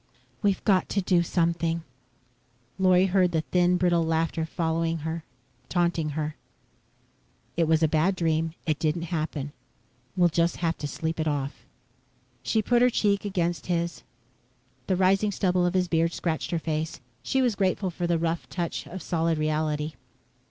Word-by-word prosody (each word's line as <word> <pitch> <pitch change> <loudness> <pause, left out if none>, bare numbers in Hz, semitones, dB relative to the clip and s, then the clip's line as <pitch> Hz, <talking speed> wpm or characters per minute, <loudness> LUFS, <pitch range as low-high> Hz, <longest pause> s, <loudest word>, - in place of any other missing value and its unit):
"We've 200 -2 +1
got 190 -3 +3
to 200 - +1
do 180 -2 +3
something." 170 -1 0 1.0
Lorry 185 0 +5
heard 190 0 +3
again - - -10
the 160 - +2
thin, 180 +2 +2
brittle 175 -1 +2
laughter 160 0 0
following 165 0 -1
her, 160 0 -3 0.5
taunting 170 -4 0
her. 155 -1 -3 1.2
"It 165 -1 +2
was 160 0 +3
a - - +5
bad 160 +5 +2
dream. 165 -1 0
It 155 -2 0
didn't 160 +1 0
happen. 155 -3 -2 0.7
We'll 175 -1 +5
just 170 +1 +1
have 165 -1 0
to 145 - -3
sleep 160 +3 -3
it 160 - 0
off." 145 -1 -3 0.7
She 220 -1 +1
put 240 +3 +3
her 250 - +6
cheek 205 -3 +1
against 175 -5 -1
his. 170 -1 -1 0.9
The 190 - +2
rising 195 +3 +3
stubble 180 -2 +1
of 175 - -2
his 180 -1 +2
beard 165 0 +1
scratched 160 -2 -2
her 170 - 0
face. 160 0 -3 0.2
She 265 -1 +1
was 245 -3 +2
grateful 190 -1 0
for 175 +1 -2
the 170 -1 +2
rough 165 0 -2
touch 170 -2 -3
of 185 +1 -7
solid 165 -1 0
reality. 155 0 -1
170 Hz, 165 wpm, -26 LUFS, 160-185 Hz, 1.2 s, her